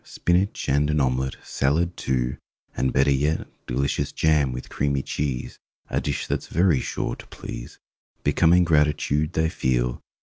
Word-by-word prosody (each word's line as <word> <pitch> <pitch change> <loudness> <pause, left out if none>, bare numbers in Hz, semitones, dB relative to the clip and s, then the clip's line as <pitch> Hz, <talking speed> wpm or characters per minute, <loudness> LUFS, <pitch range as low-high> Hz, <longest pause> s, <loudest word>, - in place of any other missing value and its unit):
Spinach 90 +3 0
and 70 +2 +2
an 75 0 +2
omelette, 65 0 0
Salad, 85 +6 0
too, 65 0 -1 0.4
and 65 - +1
better 70 +1 +3
yet 75 +4 +1 0.2
Delicious 70 +3 -1
jam 75 -4 +2
with 60 +1 -6
creamy 70 -1 -1
cheese— 70 -4 -3 0.3
A - - +1
dish 70 -3 -2
that's - - -2
very 85 -3 +3
sure - - -3
to - - -13
please! - - -8 0.5
Becoming 90 +2 +4
gratitude 75 0 +2
they 80 -1 +2
feel. 60 -5 0
70 Hz, 145 wpm, -24 LUFS, 65-80 Hz, 0.5 s, Becoming